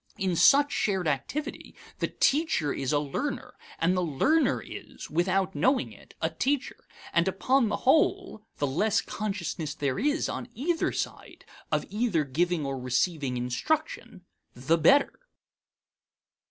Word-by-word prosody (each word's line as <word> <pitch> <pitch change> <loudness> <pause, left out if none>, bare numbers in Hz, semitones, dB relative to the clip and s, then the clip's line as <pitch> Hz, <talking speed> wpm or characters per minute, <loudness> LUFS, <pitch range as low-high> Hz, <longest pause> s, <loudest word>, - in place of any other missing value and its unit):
In 185 -2 0
such 285 - +5
shared 190 -5 0
activity, 155 - -3 0.2
the - - 0
teacher 275 - +1
is 135 -1 -2
a 150 - +3
learner, 150 - -3 0.2
and 175 +3 +2
the 180 - +1
learner 180 - +2
is, - - -10
without 185 +3 +1
knowing 260 +4 +1
it, - - -17
a - - +1
teacher 280 0 -2 0.3
and 170 +1 +3
upon 235 +5 +2
the 205 - -1
whole, 320 - +2 0.2
the 145 - 0
less 205 +11 +1
consciousness 180 -7 -4
there 140 -3 -1
is, 295 +6 +1
on 245 - -5
either 325 +7 0
side, - - -6 0.3
of - - 0
either 210 -7 +1
giving 165 +3 0
or 135 -1 -3
receiving 130 +1 0
instruction, 185 - -2 0.3
the 135 +7 +1
better. 275 - +4
190 Hz, 140 wpm, -27 LUFS, -, 0.3 s, such